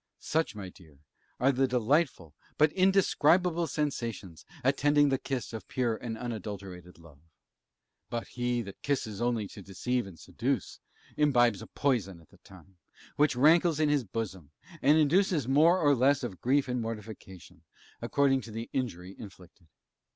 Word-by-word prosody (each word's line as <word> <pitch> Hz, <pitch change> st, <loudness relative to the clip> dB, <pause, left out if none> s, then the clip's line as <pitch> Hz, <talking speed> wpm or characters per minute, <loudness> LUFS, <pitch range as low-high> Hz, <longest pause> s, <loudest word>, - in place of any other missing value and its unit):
Such, 160 Hz, -7 st, -1 dB
my 100 Hz, -3 st, -7 dB
dear, 80 Hz, -6 st, -18 dB, 0.4 s
are 130 Hz, +3 st, +4 dB
the 135 Hz, 0 st, +1 dB
delightful, 125 Hz, -, 0 dB, 0.2 s
but 150 Hz, 0 st, +4 dB
indescribable 180 Hz, -3 st, +3 dB
sensations 115 Hz, -, -4 dB, 0.2 s
attending 145 Hz, +2 st, +3 dB
the 135 Hz, -1 st, 0 dB
kiss 130 Hz, -4 st, -4 dB
of 110 Hz, -, -7 dB
pure 120 Hz, -3 st, -1 dB
and 115 Hz, 0 st, -6 dB
unadulterated 100 Hz, -6 st, -7 dB
love. 80 Hz, -4 st, -17 dB, 0.9 s
But 120 Hz, -1 st, -4 dB
he 120 Hz, -1 st, -2 dB
that 100 Hz, -2 st, -11 dB
kisses 120 Hz, -7 st, -2 dB
only 120 Hz, -4 st, 0 dB
to 100 Hz, -, -11 dB
deceive 120 Hz, +5 st, -2 dB
and 90 Hz, -4 st, -12 dB
seduce, -, -, -3 dB, 0.4 s
imbibes 120 Hz, -8 st, +3 dB
a -, -, -9 dB
poison 105 Hz, -11 st, -1 dB
at 80 Hz, -, -21 dB
the -, -, -21 dB
time, 95 Hz, -1 st, -17 dB, 0.4 s
which 150 Hz, -2 st, +2 dB
rankles 160 Hz, +4 st, +4 dB
in 155 Hz, -1 st, +2 dB
his 145 Hz, -3 st, +2 dB
bosom, 95 Hz, -7 st, -6 dB, 0.3 s
and 150 Hz, +3 st, +5 dB
induces 160 Hz, -, +2 dB
more 155 Hz, +7 st, +5 dB
or 145 Hz, -4 st, +4 dB
less 135 Hz, +2 st, +2 dB
of 100 Hz, -7 st, -6 dB
grief 135 Hz, +3 st, +2 dB
and 125 Hz, -1 st, -2 dB
mortification, 105 Hz, -5 st, -8 dB, 0.4 s
according 135 Hz, -2 st, +2 dB
to 115 Hz, -, -10 dB
the 115 Hz, +2 st, -6 dB
injury 95 Hz, -8 st, -4 dB
inflicted. 90 Hz, -4 st, -13 dB
120 Hz, 150 wpm, -29 LUFS, 100-145 Hz, 0.9 s, and